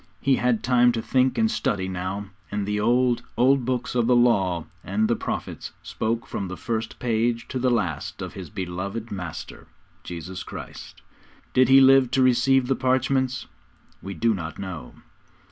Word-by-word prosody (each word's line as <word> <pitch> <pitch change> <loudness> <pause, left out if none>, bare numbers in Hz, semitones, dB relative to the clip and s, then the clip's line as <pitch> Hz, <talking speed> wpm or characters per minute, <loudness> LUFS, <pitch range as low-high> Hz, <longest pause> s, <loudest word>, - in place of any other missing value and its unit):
He 135 -1 +2
had 125 -3 +1
time 125 -1 +4
to 115 - -2
think 130 0 +2
and 225 -1 +2
study 95 -2 -1
now; 95 +2 -4 0.2
and 105 -1 -2
the 105 +1 -1
old, 120 +2 +2 0.2
old 130 0 +4
Books 125 -1 -2
of 120 -2 +1
the 125 - +4
Law 95 -9 +3 0.2
and 105 +3 0
the 120 - +2
Prophets - - -5
spoke 115 +1 -2
from 100 - -4
the 95 - -6
first 110 -1 -3
page 115 0 0
to 130 - -3
the 130 +1 +2
last 95 -12 -1
of - - -6
his - - -8
beloved 100 +5 -5
Master, 90 -5 -7 0.4
Jesus 90 +1 -7
Christ. - - -9 0.5
Did 130 -1 +4
he 135 0 +8
live 135 -1 +6
to 130 - +5
receive 130 +1 +4
the 135 +1 +1
parchments? 130 0 0 0.6
We 100 0 -6
do 115 +8 +2
not 80 -5 -5
know. 95 -4 -7
115 Hz, 170 wpm, -24 LUFS, 100-130 Hz, 0.6 s, he